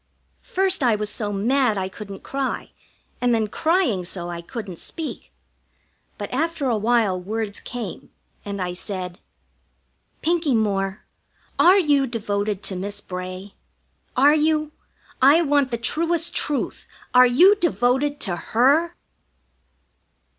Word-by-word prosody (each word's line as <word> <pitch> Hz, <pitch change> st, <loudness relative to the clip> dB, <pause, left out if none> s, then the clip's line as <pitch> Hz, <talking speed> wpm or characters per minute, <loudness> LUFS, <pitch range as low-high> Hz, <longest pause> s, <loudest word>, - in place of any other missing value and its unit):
First 380 Hz, -2 st, +1 dB
I 240 Hz, -4 st, +3 dB
was 210 Hz, 0 st, -2 dB
so 210 Hz, -3 st, -2 dB
mad 225 Hz, +2 st, +1 dB
I 190 Hz, -1 st, -1 dB
couldn't 195 Hz, 0 st, -9 dB
cry, 275 Hz, -1 st, -3 dB, 0.5 s
and 245 Hz, -1 st, +3 dB
then 220 Hz, -1 st, 0 dB
crying 310 Hz, -, +1 dB
so 175 Hz, 0 st, -3 dB
I 170 Hz, 0 st, -5 dB
couldn't 190 Hz, -1 st, -7 dB
speak. 325 Hz, -3 st, -6 dB, 0.9 s
But 205 Hz, +2 st, -6 dB
after 315 Hz, 0 st, -1 dB
a 240 Hz, -, +2 dB
while 215 Hz, -4 st, +1 dB
words 210 Hz, +2 st, -4 dB
came, 245 Hz, -2 st, -7 dB, 0.3 s
and 200 Hz, -1 st, -5 dB
I 180 Hz, -1 st, -2 dB
said: 180 Hz, -1 st, -5 dB, 1.0 s
"Pinkie 325 Hz, -5 st, +1 dB
Moore, 195 Hz, -2 st, -1 dB, 0.5 s
are 370 Hz, +3 st, +7 dB
you 290 Hz, -7 st, +3 dB
devoted 205 Hz, -3 st, -2 dB
to 190 Hz, -, -3 dB
Miss 200 Hz, +2 st, -4 dB
Bray? 185 Hz, +1 st, -7 dB, 0.6 s
Are 285 Hz, +3 st, +6 dB
you? 305 Hz, 0 st, +1 dB, 0.5 s
I 290 Hz, +6 st, +6 dB
want 285 Hz, -3 st, +2 dB
the 235 Hz, -, -2 dB
truest 330 Hz, +8 st, 0 dB
truth. 290 Hz, -2 st, -2 dB, 0.3 s
Are 250 Hz, 0 st, +8 dB
you 345 Hz, +12 st, +6 dB
devoted 285 Hz, -, +1 dB
to 185 Hz, -5 st, 0 dB
her?" 280 Hz, -, +2 dB
235 Hz, 130 wpm, -23 LUFS, 200-290 Hz, 1.0 s, Are